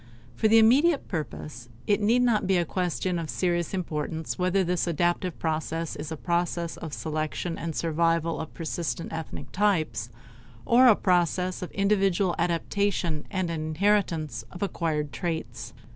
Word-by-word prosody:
For 220 - +2
the 225 +1 +6
immediate 275 +8 +5
purpose 150 - -5 0.2
it 205 0 +2
need 235 +4 +3
not 220 -6 +2
be 190 -1 +3
a 175 - +1
question 175 0 -1
of 165 -2 -5
serious 175 -2 0
importance 160 -3 -3
whether 185 +2 +2
this 180 0 0
adaptive 175 +1 0
process 160 0 -2
is 150 +1 -6
a 160 - -4
process 170 0 -1
of 160 - -7
selection 155 +3 -3
and 165 -2 -4
survival 165 0 +1
of 160 - -5
persistent 165 0 -3
ethnic 160 0 -6
types 160 - +1 0.6
or 250 +2 +6
a 225 - +8
process 180 0 +1
of 180 - -4
individual 195 -2 +2
adaptation 170 -1 0
and 185 -3 -1
an 160 -2 -3
inheritance 160 - +1
of 180 - -5
acquired 155 -6 -2
traits. 165 -2 -4
170 Hz, 150 wpm, -27 LUFS, 160-190 Hz, 0.6 s, a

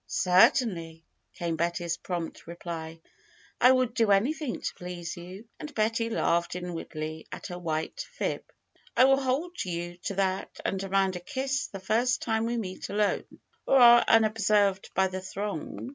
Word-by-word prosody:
Certainly 180 - +3
!" - - -50
came 170 -2 -2
Betty's 170 0 -1
prompt 170 -2 -5
reply. 165 -1 -7 0.6
would 255 -1 +5
do 225 -3 +2
anything 250 +7 +1
to - - -3
please 175 -1 -6
you!" 185 +6 -10
And 300 - -7
Betty 225 +1 +1
laughed 170 -6 0
in 180 -1 -5
wardly 155 -1 -6
at - - -8
her 180 -2 -6
white 160 - -3
fib. - - -2 0.5
will 270 +2 +6
hold 295 +7 -1
you 175 -1 -4
to 200 - -2
that 190 -1 -1
and 190 - -1
demand 195 -1 +1
a - - -6
kiss 265 +7 -2
the 195 - -8
first 240 +6 +1
time 225 0 0
we 240 0 -1
meet 185 -5 -5
alone, 205 0 +1 0.4
or 270 - +5
are 240 -1 +8
unobserved 210 -3 +3
by 190 - +4
the 185 0 -3
throng. 195 +2 -5
195 Hz, 160 wpm, -28 LUFS, 175-230 Hz, 0.6 s, are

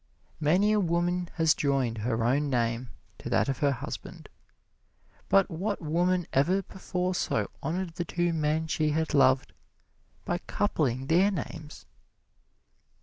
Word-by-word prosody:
Many 180 +7 +3
a 215 - +3
woman 175 0 0
has 160 -2 +4
joined 135 -5 0
her 115 +1 -1
own 140 +5 +1
name 120 -1 -1 0.3
to - - -6
that - - +2
of 135 -2 -2
her 145 -1 +3
husband, 130 - -7 1.0
but 95 0 +5
what 195 +5 -2
woman 175 +3 +1
ever 180 +9 +2
before 185 0 -3
so - - -1
honored 175 +2 -2
the 175 +1 -3
two 175 0 0
men 155 0 0
she 155 -1 0
had 160 +1 -1
loved 130 -2 +3 0.7
by 175 - -1
coupling 135 - -1
their 175 +7 +4
names! 155 -4 -6
160 Hz, 140 wpm, -28 LUFS, 135-175 Hz, 1.0 s, but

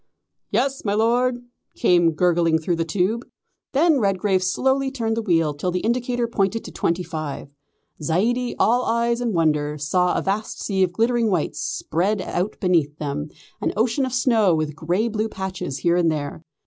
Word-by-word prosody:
"Yes, 270 0 0
my 205 -1 0
Lord," 240 +3 +1 0.3
came 175 -6 +3
gurgling 170 -1 +2
through 165 +2 -1
the 165 - +1
tube. 195 +8 0 0.5
Then 305 +1 +4
Redgrave 195 -2 +1
slowly 265 +8 +1
turned 230 -4 -2
the 230 - -1
wheel 165 -7 +1
till 150 +5 -3
the 180 0 -1
indicator 240 +1 0
pointed 220 0 0
to - - -8
twenty 170 +2 -1
five. 155 -4 -5 0.5
Zaidie, 230 +11 0
all 245 +3 +3
eyes 235 +1 +1
and 240 -2 0
wonder, 150 -2 +1
saw 180 +5 +1
a - - -1
vast 205 +3 -2
sea 195 -2 -1
of 185 -2 +3
glittering 230 +3 +1
white 180 -6 0
spread 195 +6 -1
out 185 +2 -3
beneath 160 -6 +1
them, 145 0 -4 0.3
an - - 0
ocean 235 +5 +1
of 260 - -1
snow 225 -8 +3
with 155 -2 -2
grey 175 +8 0
blue 220 0 -2
patches 190 -8 -4
here 170 +3 +2
and 170 -2 +3
there. 145 0 -4
190 Hz, 175 wpm, -22 LUFS, 165-235 Hz, 0.5 s, Then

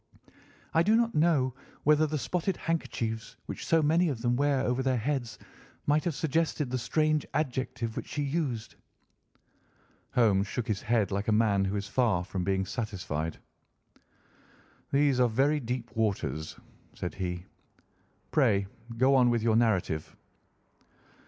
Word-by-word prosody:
I 165 - +5
do 210 +6 +4
not 230 0 +2
know 150 -5 +3 0.3
whether 150 +1 +4
the 155 0 -2
spotted 180 +5 -1
handkerchiefs 115 -9 -3
which - - -6
so 165 -1 +4
many 165 +3 +3
of 130 -6 -3
them 120 0 +2
wear 140 0 +2
over 125 0 0
their 130 -1 +1
heads 120 -2 -2 0.5
might 150 +3 +2
have 170 -4 -1
suggested 150 -2 0
the 130 - 0
strange 155 +3 +1
adjective 130 -5 -2
which - - -5
she 145 - -2
used." 140 -6 -2 1.4
Holmes 105 -5 +3
shook 120 +3 -3
his 105 -3 -1
head 110 -4 +1
like 100 +1 -2
a - - +3
man 105 -3 +3
who 95 +2 -1
is 100 -1 -3
far 105 -5 +1
from 95 0 -4
being 95 +1 0
satisfied. 90 -7 -3 1.5
"These 140 -2 +3
are 125 -1 +4
very 140 +6 +2
deep 120 -2 -4
waters," 100 -8 -1 0.4
said 90 - -4
he; 90 -2 -4 0.9
"pray 100 0 +3 0.3
go 130 +3 +4
on 125 -2 +5
with 120 -2 +1
your 115 -1 +3
narrative." 95 -9 +1
125 Hz, 145 wpm, -29 LUFS, 105-145 Hz, 1.5 s, I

